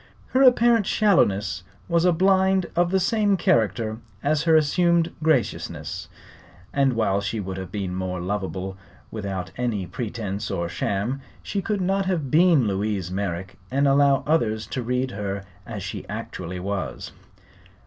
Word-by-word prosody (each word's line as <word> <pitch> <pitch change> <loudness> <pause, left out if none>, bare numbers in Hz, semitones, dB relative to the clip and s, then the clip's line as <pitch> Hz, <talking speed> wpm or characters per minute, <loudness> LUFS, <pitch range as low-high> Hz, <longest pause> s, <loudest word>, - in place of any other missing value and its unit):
Her 260 - +2
apparent 240 -4 +5
shallowness 100 - +2 0.3
was 170 0 +2
a 180 - +5
blind 190 +1 +3
of 175 0 +3
the 190 +1 +2
same 205 +1 +2
character 110 - +1 0.2
as 150 +1 +2
her 165 -1 +5
assumed 170 +2 +3
graciousness, 155 -6 -1 0.6
and 135 -2 +3
while 100 -4 +1
she 100 +3 -2
would 95 -1 -4
have 95 -1 -6
been 95 -3 -3
more 90 0 -3
lovable 95 0 -3 0.3
without 95 -4 -4
any 115 -6 -1
pretence 105 +1 -4
or 85 0 -2
sham 100 +9 -2 0.2
she 200 - -2
could 205 -1 -1
not 195 +1 +1
have 160 -9 -1
been 165 -5 +5
Louise 100 -2 -1
Merrick 95 -1 -4
and 140 +2 +2
allow 140 0 +4
others 110 -9 +1
to 130 - -1
read 125 +2 -1
her 100 -1 -4 0.2
as 105 -5 -5
she 95 - -6
actually 95 -4 -5
was. 95 -8 -4
115 Hz, 150 wpm, -24 LUFS, -, 0.6 s, apparent